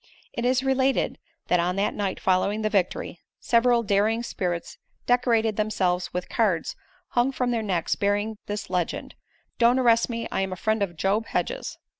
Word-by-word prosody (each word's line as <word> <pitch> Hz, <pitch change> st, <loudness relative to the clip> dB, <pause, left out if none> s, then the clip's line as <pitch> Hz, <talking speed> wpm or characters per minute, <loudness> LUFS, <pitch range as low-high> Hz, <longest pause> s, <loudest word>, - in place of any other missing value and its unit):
It 235 Hz, -, -3 dB
is 255 Hz, +1 st, +2 dB
related 265 Hz, 0 st, +1 dB, 0.3 s
that 180 Hz, -, +3 dB
on 180 Hz, +1 st, 0 dB
the 200 Hz, +1 st, +1 dB
night 200 Hz, -2 st, -3 dB
following 200 Hz, +3 st, +1 dB
the 215 Hz, -, 0 dB
victory, 180 Hz, -3 st, -1 dB, 0.2 s
several 235 Hz, 0 st, +3 dB
daring 215 Hz, +3 st, +1 dB
spirits 175 Hz, -7 st, -4 dB, 0.3 s
decorated 230 Hz, -3 st, +2 dB
themselves 185 Hz, -4 st, 0 dB
with 180 Hz, 0 st, -4 dB
cards 195 Hz, -8 st, 0 dB, 0.3 s
hung 245 Hz, +2 st, +2 dB
from 250 Hz, -2 st, -1 dB
their 230 Hz, -2 st, 0 dB
necks 185 Hz, -6 st, 0 dB
bearing 205 Hz, +2 st, 0 dB
this 210 Hz, +1 st, -4 dB
legend, 180 Hz, -2 st, -2 dB, 0.5 s
"Don't 240 Hz, +2 st, +5 dB
arrest 235 Hz, -2 st, +3 dB
me, 230 Hz, -1 st, -3 dB
I -, -, 0 dB
am 190 Hz, 0 st, -2 dB
a -, -, -3 dB
friend 220 Hz, +4 st, 0 dB
of 175 Hz, -4 st, -2 dB
Job 205 Hz, +6 st, 0 dB
Hedges." -, -, -3 dB
215 Hz, 170 wpm, -25 LUFS, 190-235 Hz, 0.5 s, Don't